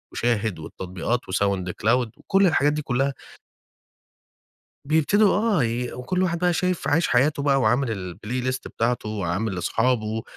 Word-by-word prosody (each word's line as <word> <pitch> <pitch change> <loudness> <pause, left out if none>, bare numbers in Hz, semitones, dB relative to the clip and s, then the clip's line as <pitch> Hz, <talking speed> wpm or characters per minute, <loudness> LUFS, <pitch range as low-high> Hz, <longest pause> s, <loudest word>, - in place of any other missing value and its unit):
وShahid 110 -6 0
والتطبيقات 95 +8 -3
وSoundCloud 100 +5 0
وكل 195 +5 +2
الحاجات 145 -2 +3
دي 150 - -2
كلها 135 0 0 1.7
بيبتدوا 160 +8 +3
آه، 210 - +2
ي 120 +2 -2
وكل 180 +9 -2
واحد 170 -2 0
بقى 180 0 +2
شايِف 180 +1 -1
عايِش 165 +4 +2
حياته 140 +3 +2
بقى، 140 -1 +3
وعامل 125 +3 +2 0.3
الplaylist 125 +5 -3
بتاعته، 115 -1 -1
وعامل 100 0 -2
لأصحابه، 110 +4 0
125 Hz, 125 wpm, -24 LUFS, 110-150 Hz, 1.7 s, الحاجات